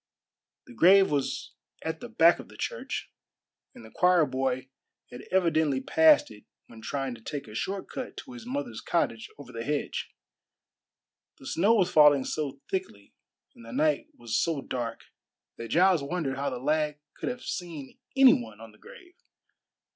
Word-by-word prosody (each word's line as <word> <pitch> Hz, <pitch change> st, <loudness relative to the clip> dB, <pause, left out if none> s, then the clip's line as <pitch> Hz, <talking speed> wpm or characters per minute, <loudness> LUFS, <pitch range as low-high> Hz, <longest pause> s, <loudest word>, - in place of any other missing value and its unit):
The -, -, -14 dB
grave 190 Hz, -, +6 dB
was 140 Hz, -2 st, -2 dB, 0.3 s
at -, -, -3 dB
the -, -, -8 dB
back -, -, +5 dB
of -, -, -10 dB
the -, -, -15 dB
church, -, -, -4 dB, 0.6 s
and 115 Hz, -, -12 dB
the 110 Hz, -, -14 dB
choir 180 Hz, -3 st, +4 dB
boy 130 Hz, -1 st, -2 dB, 0.4 s
had 125 Hz, +2 st, -10 dB
evidently 160 Hz, -7 st, +2 dB
passed 310 Hz, -, +4 dB
it 105 Hz, -1 st, -14 dB, 0.2 s
when 115 Hz, -1 st, -14 dB
trying 135 Hz, +2 st, -3 dB
to 115 Hz, -, -12 dB
take 140 Hz, +3 st, -6 dB
a 105 Hz, -, -11 dB
short 190 Hz, -, -3 dB
cut 260 Hz, -, -7 dB
to 265 Hz, -, -9 dB
his 245 Hz, -2 st, -9 dB
mother's 255 Hz, +1 st, -4 dB
cottage 115 Hz, -9 st, -1 dB
over 140 Hz, -3 st, -11 dB
the 115 Hz, -1 st, -5 dB
hedge. 145 Hz, +2 st, -3 dB, 1.3 s
The -, -, -15 dB
snow 195 Hz, +11 st, +3 dB
was 185 Hz, -5 st, +2 dB
falling 145 Hz, -3 st, +6 dB
so 140 Hz, -3 st, -4 dB
thickly 185 Hz, -, -5 dB, 0.4 s
and -, -, -16 dB
the 115 Hz, -, -10 dB
night 150 Hz, +3 st, +1 dB
was 120 Hz, -2 st, -4 dB
so 160 Hz, -5 st, -1 dB
dark 120 Hz, -2 st, -4 dB, 0.6 s
that 115 Hz, -, -6 dB
Giles 175 Hz, -, +4 dB
wondered 140 Hz, -2 st, -2 dB
how 140 Hz, +1 st, -2 dB
the 130 Hz, -, -5 dB
lad 150 Hz, +3 st, 0 dB, 0.2 s
could -, -, -4 dB
have 245 Hz, 0 st, -6 dB
seen 160 Hz, -7 st, -6 dB, 0.2 s
any 265 Hz, -1 st, +8 dB
one 110 Hz, -3 st, -4 dB
on 115 Hz, -1 st, -11 dB
the 110 Hz, -, -23 dB
grave. 355 Hz, -1 st, -15 dB
145 Hz, 170 wpm, -28 LUFS, 125-180 Hz, 1.3 s, any